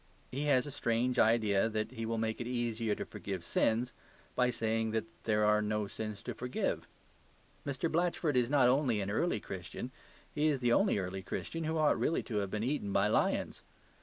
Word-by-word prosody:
He 140 Hz, +3 st, -2 dB
has 135 Hz, -3 st, +3 dB
a 145 Hz, -, -6 dB
strange 125 Hz, -1 st, 0 dB
idea 110 Hz, -2 st, +4 dB
that 110 Hz, -1 st, -2 dB
he 115 Hz, 0 st, -4 dB
will 115 Hz, 0 st, -1 dB
make 110 Hz, +1 st, -1 dB
it 120 Hz, -, -3 dB
easier 115 Hz, -3 st, -1 dB
to -, -, -4 dB
forgive 95 Hz, -4 st, -5 dB
sins 115 Hz, +7 st, +1 dB, 0.4 s
by 125 Hz, -1 st, +3 dB
saying 115 Hz, -1 st, 0 dB
that 110 Hz, 0 st, 0 dB, 0.2 s
there 105 Hz, -1 st, +3 dB
are 105 Hz, 0 st, +4 dB
no 105 Hz, 0 st, 0 dB
sins 105 Hz, 0 st, -6 dB
to -, -, -4 dB
forgive. 125 Hz, 0 st, -2 dB, 0.8 s
Mr. 140 Hz, +3 st, -1 dB
Blatchford 170 Hz, -2 st, +1 dB
is 125 Hz, -1 st, +3 dB
not 140 Hz, -3 st, +5 dB
only 125 Hz, -4 st, +3 dB
an 100 Hz, 0 st, -2 dB
early 140 Hz, +3 st, +1 dB
Christian, 95 Hz, +7 st, -6 dB, 0.4 s
he 150 Hz, +1 st, +2 dB
is 145 Hz, -3 st, +2 dB
the 120 Hz, -1 st, +2 dB
only 195 Hz, -, +3 dB
early 95 Hz, 0 st, -3 dB
Christian 165 Hz, -, -4 dB
who 160 Hz, +1 st, 0 dB
ought 155 Hz, -1 st, +3 dB
really 165 Hz, -, +1 dB
to 110 Hz, -, -3 dB
have 100 Hz, -2 st, 0 dB
been 105 Hz, +2 st, -2 dB
eaten 125 Hz, -6 st, -1 dB
by 100 Hz, +2 st, +3 dB
lions. 110 Hz, -, +1 dB
115 Hz, 195 wpm, -33 LUFS, 105-130 Hz, 0.8 s, not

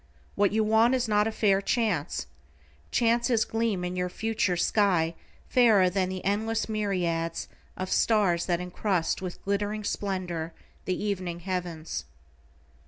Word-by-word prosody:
What 205 Hz, -1 st, +2 dB
you 220 Hz, +1 st, +2 dB
want 220 Hz, +4 st, +4 dB
is 250 Hz, -2 st, 0 dB
not 210 Hz, 0 st, +3 dB
a -, -, -1 dB
fair 200 Hz, -3 st, +2 dB
chance, 200 Hz, -, 0 dB, 0.6 s
chances 235 Hz, -, +2 dB
gleam 225 Hz, -5 st, -1 dB
in 180 Hz, 0 st, -3 dB
your 180 Hz, 0 st, -1 dB
future 215 Hz, -3 st, -1 dB
sky 175 Hz, -3 st, +2 dB, 0.3 s
fairer 215 Hz, -7 st, +5 dB
than 185 Hz, 0 st, 0 dB
the 185 Hz, 0 st, -5 dB
endless 220 Hz, +3 st, 0 dB
myriads 180 Hz, -6 st, -1 dB, 0.3 s
of 185 Hz, 0 st, -4 dB
stars 200 Hz, -6 st, +2 dB
that 175 Hz, -2 st, +1 dB
encrust 180 Hz, -1 st, -1 dB
with 180 Hz, -2 st, -7 dB
glittering 205 Hz, +2 st, -1 dB
splendor 180 Hz, -5 st, -3 dB, 0.3 s
the 185 Hz, -, 0 dB
evening 185 Hz, -4 st, -3 dB
heavens. 170 Hz, -, -4 dB
195 Hz, 135 wpm, -27 LUFS, 180-215 Hz, 0.6 s, fairer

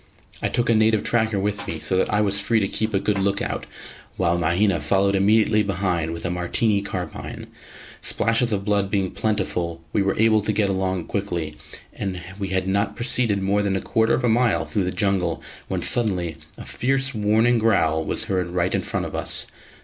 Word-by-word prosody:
I -, -, 0 dB
took 120 Hz, 0 st, 0 dB
a 115 Hz, -, +4 dB
native 110 Hz, -1 st, +3 dB
tracker 110 Hz, -3 st, +1 dB
with 100 Hz, +1 st, -2 dB
me, 80 Hz, -, -3 dB
so 95 Hz, -, 0 dB
that 95 Hz, -, +1 dB
I 105 Hz, -, +2 dB
was 100 Hz, -1 st, +1 dB
free 110 Hz, +2 st, +2 dB
to 100 Hz, -, 0 dB
keep 110 Hz, +2 st, -1 dB
a -, -, +3 dB
good 100 Hz, 0 st, 0 dB
look 100 Hz, +1 st, +1 dB
out, -, -, -3 dB, 0.5 s
while 85 Hz, 0 st, +2 dB
Mahina 85 Hz, +3 st, +2 dB
followed 100 Hz, 0 st, +2 dB
immediately 105 Hz, +2 st, +3 dB
behind 90 Hz, -5 st, -1 dB
with 85 Hz, -, -6 dB
a 90 Hz, -, 0 dB
Martini 100 Hz, +4 st, +1 dB
carbine. 90 Hz, -4 st, -6 dB, 0.6 s
Splashes 115 Hz, +1 st, +1 dB
of 100 Hz, -2 st, -1 dB
blood 100 Hz, -2 st, +1 dB
being 95 Hz, -2 st, 0 dB
plentiful, 90 Hz, -6 st, -1 dB
we 105 Hz, -, +2 dB
were 95 Hz, 0 st, 0 dB
able 110 Hz, 0 st, +4 dB
to 105 Hz, -, -1 dB
get 105 Hz, -1 st, +1 dB
along 95 Hz, -2 st, -1 dB
quickly; 85 Hz, -6 st, -3 dB, 0.4 s
and 95 Hz, -2 st, -4 dB, 0.2 s
we 100 Hz, -, -2 dB
had 95 Hz, 0 st, -1 dB
not 100 Hz, +2 st, 0 dB
proceeded 120 Hz, -5 st, 0 dB
more 100 Hz, +2 st, +2 dB
than 100 Hz, -1 st, 0 dB
a -, -, 0 dB
quarter 110 Hz, 0 st, +2 dB
of -, -, -3 dB
a -, -, +3 dB
mile 120 Hz, +1 st, +2 dB
through 100 Hz, -4 st, -1 dB
the 90 Hz, -, -1 dB
jungle 95 Hz, -1 st, 0 dB, 0.2 s
when -, -, -3 dB
suddenly 90 Hz, -8 st, +1 dB, 0.2 s
a -, -, -9 dB
fierce 135 Hz, +1 st, 0 dB
warning 110 Hz, +2 st, +2 dB
growl 80 Hz, -8 st, +2 dB
was -, -, -2 dB
heard 95 Hz, -5 st, -1 dB
right 90 Hz, +1 st, 0 dB
in -, -, +1 dB
front -, -, -3 dB
of -, -, -7 dB
us. -, -, 0 dB
100 Hz, 205 wpm, -23 LUFS, 95-110 Hz, 0.6 s, a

